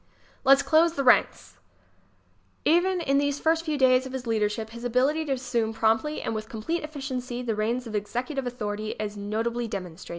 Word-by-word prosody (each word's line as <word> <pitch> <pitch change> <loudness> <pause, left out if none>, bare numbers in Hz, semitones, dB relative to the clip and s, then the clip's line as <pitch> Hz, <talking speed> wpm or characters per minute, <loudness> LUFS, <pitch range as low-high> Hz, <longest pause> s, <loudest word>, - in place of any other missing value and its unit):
"Let's 275 +1 +6
Close 330 +1 +4
the 280 - -1
Ranks" 250 - +2 1.1
Even 355 +3 +3
in 275 -3 +2
these 285 0 0
first 325 +1 +2
few 310 -3 -2
days 260 -1 +4
of 260 - -10
his 260 -1 -5
leadership 220 0 -1
his 235 +1 -9
ability 265 +6 +1
to 280 - 0
assume 240 -4 -1
promptly 225 +7 +1
and - - -2
with 215 0 -5
complete 235 +10 -3
effi 305 -2 -7
ciency 250 -2 -4
the 230 - 0
reins 230 +4 -1
of 225 - -8
executive 245 +6 -3
authority 215 -3 -4
is 210 -1 -3
notably 225 +4 -2
demonstrated. 180 -4 -7
250 Hz, 185 wpm, -26 LUFS, 220-280 Hz, 1.1 s, Let's